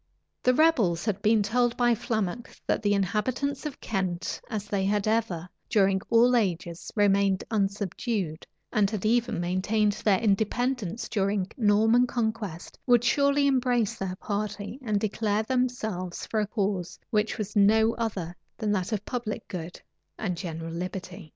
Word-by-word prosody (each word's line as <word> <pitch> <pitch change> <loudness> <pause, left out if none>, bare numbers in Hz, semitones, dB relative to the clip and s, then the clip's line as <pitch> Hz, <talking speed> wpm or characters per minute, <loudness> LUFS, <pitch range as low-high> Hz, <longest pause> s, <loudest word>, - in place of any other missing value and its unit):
The 255 0 +3
rebels 235 - +3
had 210 -4 -1
been 215 -1 +4
told 240 +3 +1
by 240 -1 +4
Flammoc 220 -1 -3
that - - 0
the 205 -1 +2
inhabitants 250 - -1
of 290 - -8
Kent, 185 -4 -2
as 215 -3 -3
they 200 -2 -1
had 205 +1 +1
ever, 215 -6 0 0.2
during 195 -2 +3
all 240 +2 +5
ages, 175 -6 -1
remained 200 -2 +3
unsubdued, 200 -4 -2 0.3
and 210 -4 +3
had 215 -2 -4
even 230 -3 +2
maintained 190 +4 +1
their 195 -3 +4
independence 220 0 0
during 200 -2 0
the 185 - -11
Norman 220 +4 +4
conquest, 220 -8 -3
would 240 -2 +5
surely 280 +2 +3
embrace 250 -5 +2
their 185 -1 -4
party, 205 +4 -4
and 215 -5 0
declare 215 0 0
themselves 220 -8 -2
for 220 - -1
a 210 - 0
cause 195 -4 -2
which 215 0 +1
was 210 0 -4
no 220 +2 +5
other 195 -7 -3 0.2
than 215 -3 -1
that 190 0 -1
of 210 -1 -2
public 240 -4 -4
good 175 -1 -6 0.4
and 190 -5 -2
general 165 -2 -5
liberty. 180 0 -6
210 Hz, 150 wpm, -27 LUFS, 190-230 Hz, 0.4 s, all